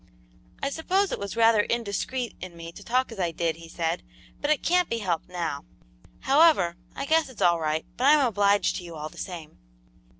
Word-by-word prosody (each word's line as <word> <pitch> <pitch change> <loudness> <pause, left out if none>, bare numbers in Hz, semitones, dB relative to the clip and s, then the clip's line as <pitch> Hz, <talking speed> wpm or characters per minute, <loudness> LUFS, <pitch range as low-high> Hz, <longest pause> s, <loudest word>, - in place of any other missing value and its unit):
"I 275 - 0
suppose 375 +6 0
it - - -3
was 200 +1 -5
rather 225 -2 +5
indiscreet 235 +2 -2
in 180 -2 -8
me 165 0 -8
to 200 - -12
talk 255 +3 0
as 225 - -9
I 175 -2 +1
did," 165 -1 -2
he 165 0 -12
said, 165 -1 -2 0.4
"but 290 - -1
it 305 - +2
can't 360 0 +2
be 230 - -1
helped 180 -7 -2
now. 170 -5 -3 0.6
However, 280 - +4 0.2
I - - -3
guess 320 0 +2
it's 255 - -14
all 170 -1 +4
right, 155 0 -1
but 255 - 0
I'm 295 -1 +6
obliged 205 -3 +2
to 180 - -7
you 170 -1 -9
all 155 0 -5
the - - -13
same." 165 -5 -8
200 Hz, 205 wpm, -26 LUFS, 170-260 Hz, 0.6 s, I'm